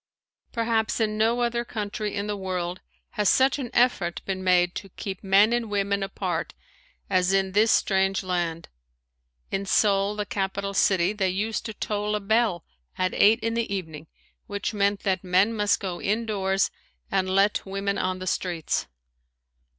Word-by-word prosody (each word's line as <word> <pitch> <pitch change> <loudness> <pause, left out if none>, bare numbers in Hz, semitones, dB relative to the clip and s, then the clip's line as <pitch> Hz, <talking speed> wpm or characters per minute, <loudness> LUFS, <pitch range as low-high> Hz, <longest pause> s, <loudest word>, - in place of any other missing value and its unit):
Perhaps 230 -1 0
in 215 -1 0
no 225 +3 +2
other 235 0 0
country 210 -2 -4
in 200 0 -2
the 210 0 -2
world 185 -2 -3 0.3
has 210 -2 +1
such 265 +2 +3
an 250 -3 -4
effort 215 -8 +1
been 190 -1 -3
made 180 -1 +3
to 195 - -7
keep 190 +1 -7
men 200 +4 +5
and 240 -2 -1
women 200 -1 0
apart 195 0 -3 0.5
as 185 -1 +2
in 190 -1 +2
this 215 +3 +4
strange 195 -1 +2
land. 170 -3 -2 0.8
In 195 - -1
Seoul, 200 0 +2
the 210 0 -2
capital 200 0 -3
city, 190 -1 +3
they 195 -3 0
used 210 +6 -2
to 220 - -6
toll 210 0 -2
a - - 0
bell 210 -3 +1 0.3
at 185 0 0
eight 220 +3 +5
in 230 0 -1
the 230 -2 -2
evening 160 -5 -5 0.4
which 205 +2 -3
meant 200 0 +1
that 190 -3 0
men 190 +4 +3
must 210 -3 +1
go 185 -3 -4
indoors 200 -3 0 0.4
and 190 -1 +1
let 195 +2 +2
women 195 +1 -2
on 185 0 -1
the 185 - -6
streets. 175 -3 -1
200 Hz, 165 wpm, -25 LUFS, 185-215 Hz, 0.8 s, men